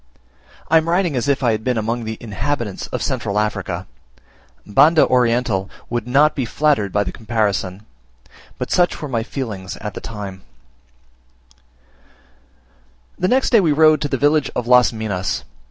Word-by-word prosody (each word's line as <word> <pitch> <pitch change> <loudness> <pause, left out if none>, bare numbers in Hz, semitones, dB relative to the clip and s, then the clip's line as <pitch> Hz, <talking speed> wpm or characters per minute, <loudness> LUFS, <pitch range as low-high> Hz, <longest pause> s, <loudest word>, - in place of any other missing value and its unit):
I 160 - +5
am 160 +1 +1
writing 175 -3 +1
as 125 +2 -1
if 140 -1 +1
I 120 - +3
had 110 0 -2
been 125 -1 0
among 115 +2 -2
the 110 0 -5
inhabitants 115 0 -3
of - - -4
central 100 - -2
Africa: 100 -4 -2 0.8
Banda 155 +10 +5
Oriental 120 -5 +1 0.2
would 120 -1 -2
not 145 +5 +4
be 135 - -2
flattered 130 -4 +1
by 105 +1 +1
the 90 - -5
comparison; 105 -4 -2 0.7
but - - -5
such 175 -1 +2
were 150 - -5
my 120 -4 -1
feelings 110 -7 -5
at 105 -1 -6
the - - -7
time. 100 -4 -7 2.8
The 185 - +1
next 260 +6 +2
day 230 - +6
we 165 -6 +2
rode 155 +1 +5
to 145 - 0
the - - 0
village 145 -1 +2
of 125 - -2
Las 125 0 +5
Minas. 105 -5 -3
120 Hz, 160 wpm, -20 LUFS, 105-145 Hz, 2.8 s, day